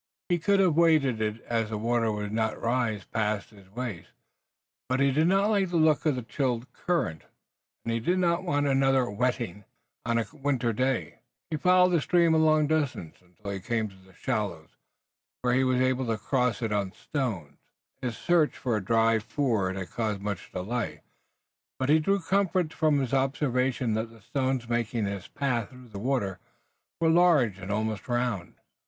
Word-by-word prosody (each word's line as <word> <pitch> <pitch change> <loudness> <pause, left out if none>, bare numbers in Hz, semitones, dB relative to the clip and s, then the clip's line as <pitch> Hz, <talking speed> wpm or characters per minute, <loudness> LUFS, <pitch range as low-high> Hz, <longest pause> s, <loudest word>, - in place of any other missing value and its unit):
He 175 -1 +2
could 200 +5 +2
have 180 -5 +4
waded 155 -8 +3
it 110 +1 -2
as 115 -2 -1
the 110 - -3
water 115 +1 +1
would 105 -1 -4
not 110 0 -1
rise 115 -4 -1
past 105 -2 -2
his 100 -3 -17
waist, 115 -4 -6 0.8
but 130 +1 +1
he 140 0 +4
did 155 +5 +2
not 195 +3 +3
like 195 -3 +2
the 175 - -4
look 155 -1 +3
of 150 - +2
the 125 - -4
chill 125 -1 -1
current, 165 - -2 0.6
and 115 - -1
he 115 - 0
did 175 +11 +1
not 175 0 +1
want 145 -5 0
another 135 -2 +3
wetting 110 -3 -2 0.4
on 115 0 0
a 115 - +1
winter 135 -5 0
day. 130 - -1 0.3
He 155 - 0
followed 180 +2 +5
the 170 -3 +2
stream 170 +1 +3
a 160 - +4
long 155 -1 +4
distance, 145 - -1
until 95 +3 -9
he 100 - -4
came 110 +2 -1
to 95 -1 -19
shallows, 105 -11 -3 0.7
where 125 0 +2
he 130 +1 +3
was 130 -1 +2
able 130 0 +1
to 115 -1 0
cross 125 0 0
it 110 - -1
on 100 -2 -1
stones. 95 - -4 0.4
His 125 -3 -3
search 170 -3 +2
for 120 -4 -1
a 105 - -2
dry 115 +2 +3
ford 110 -6 -1
had 95 -3 -6
caused 110 -3 -2
much 100 -2 -5
delay, 110 +6 -3 0.8
but 130 +1 -1
he 155 +2 +6
drew 195 +5 +1
comfort 185 -2 +1
from 155 -2 +2
his 135 -2 -1
observation 130 -3 +1
that 110 +1 -2
the 115 -1 -17
stones 130 0 -1
making 120 -2 -1
his 100 -2 -4
pathway 125 -4 -2
through 125 -1 -14
the 100 -2 -7
water 105 -6 -1 0.6
were 165 - +2
large 160 - +4
and 95 +1 -6
almost 110 0 -2
round. 120 -7 -2
125 Hz, 185 wpm, -28 LUFS, 110-145 Hz, 0.8 s, he